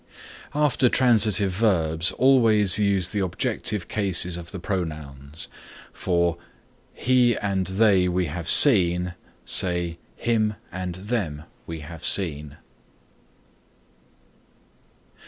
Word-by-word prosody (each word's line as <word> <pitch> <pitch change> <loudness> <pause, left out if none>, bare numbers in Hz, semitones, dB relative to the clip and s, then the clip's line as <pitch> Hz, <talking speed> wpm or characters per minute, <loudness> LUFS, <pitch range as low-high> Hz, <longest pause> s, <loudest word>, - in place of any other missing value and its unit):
After 145 -4 +2
transitive 110 -7 +2
verbs 85 -5 0
always 110 -7 +3
use 100 -3 +1
the 105 - -3
objective 95 +1 -2
cases 90 -4 0
of 85 -1 -9
the 95 - -7
pronouns. 75 -6 -4 0.5
For 85 -2 -1 0.6
"He 125 -2 +2
and 95 -3 -2
they 95 -1 +2
we 90 0 -1
have 85 +2 -5
seen," 90 -8 +5 0.3
say 85 -2 0 0.2
"Him 110 -2 -1 0.2
and 90 -1 -5
them 95 -7 -4 0.2
we 80 -1 -7
have 80 +2 -11
seen." 75 -6 0
95 Hz, 100 wpm, -23 LUFS, 85-105 Hz, 0.6 s, seen